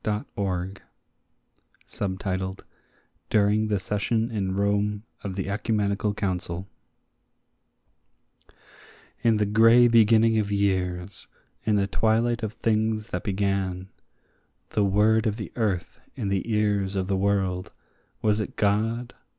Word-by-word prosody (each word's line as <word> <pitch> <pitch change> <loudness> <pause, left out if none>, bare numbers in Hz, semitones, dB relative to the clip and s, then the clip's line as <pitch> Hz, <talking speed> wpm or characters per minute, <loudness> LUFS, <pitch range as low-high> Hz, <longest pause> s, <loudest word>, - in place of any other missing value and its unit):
HYMN 100 -3 -3 1.2
OF 95 -2 -2
MAN 95 0 -1 0.8
(DURING 105 +1 +3
THE 105 -1 +1
SESSION 110 +4 -1
IN 95 -4 -2
ROME 100 +1 0 0.2
OF 95 -2 -4
THE 95 -1 -3
ECUMENICAL 105 0 -1
COUNCIL) 90 -2 -3 2.5
IN 115 -2 +3
the 105 - +2
grey 115 +4 +6
beginning 115 -1 +5
of 105 -1 -2
years, 95 -2 -1 0.4
in 110 - +2
the 100 -1 +2
twilight 115 +4 +1
of 110 -2 -3
things 110 0 0
that 90 - -3
began, 95 -2 -1 0.8
The 105 - +1
word 110 +3 +3
of 105 - 0
the 105 - -6
earth 100 -7 -2 0.2
in 100 - -3
the 100 +4 -1
ears 100 -2 +1
of 95 -1 0
the 95 +1 0
world, 95 -2 0 0.5
was 105 0 +2
it 105 - -4
God? 115 +4 0
100 Hz, 120 wpm, -25 LUFS, 95-110 Hz, 2.5 s, grey